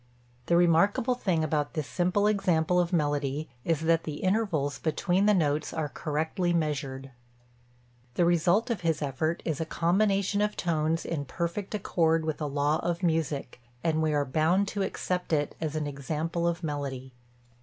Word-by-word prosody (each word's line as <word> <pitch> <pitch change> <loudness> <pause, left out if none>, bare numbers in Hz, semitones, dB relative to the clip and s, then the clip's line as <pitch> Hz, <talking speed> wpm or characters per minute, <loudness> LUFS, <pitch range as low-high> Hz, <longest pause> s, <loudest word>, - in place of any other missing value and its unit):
The 170 - +3
remarkable 175 +8 +3
thing 185 -10 0
about 150 0 -1
this 155 -2 -1
simple 180 +6 +1
example 180 -4 +2
of 175 -1 +1
melody 145 -2 0
is 165 -2 0
that 165 0 +2
the 150 - -4
intervals 185 -9 0
between 180 +5 +1
the 210 - +6
notes 150 -3 0
are 155 -2 -2
correctly 160 +5 -1
measured. 140 -4 -2 1.0
The 175 - +3
result 175 +7 +3
of 230 - -2
his 160 -3 0
effort 155 +5 -2
is 160 -2 -1
a - - +2
combination 195 +4 +1
of 210 0 0
tones 165 -1 0
in 150 -4 -3
perfect 170 +8 -3
accord 165 -5 +1
with 155 0 -3
a 150 - -1
law 145 +2 +1
of 175 +1 -2
music, 155 -7 -1 0.2
and 160 -1 +1
we 155 -1 +1
are 145 -1 +1
bound 160 +8 +2
to 205 - -3
accept 180 -2 -2
it 145 -2 +1
as 155 -1 -2
an 155 -1 -1
example 155 +4 -2
of 170 +1 -2
melody. 135 -4 -4
160 Hz, 165 wpm, -28 LUFS, 150-180 Hz, 1.0 s, the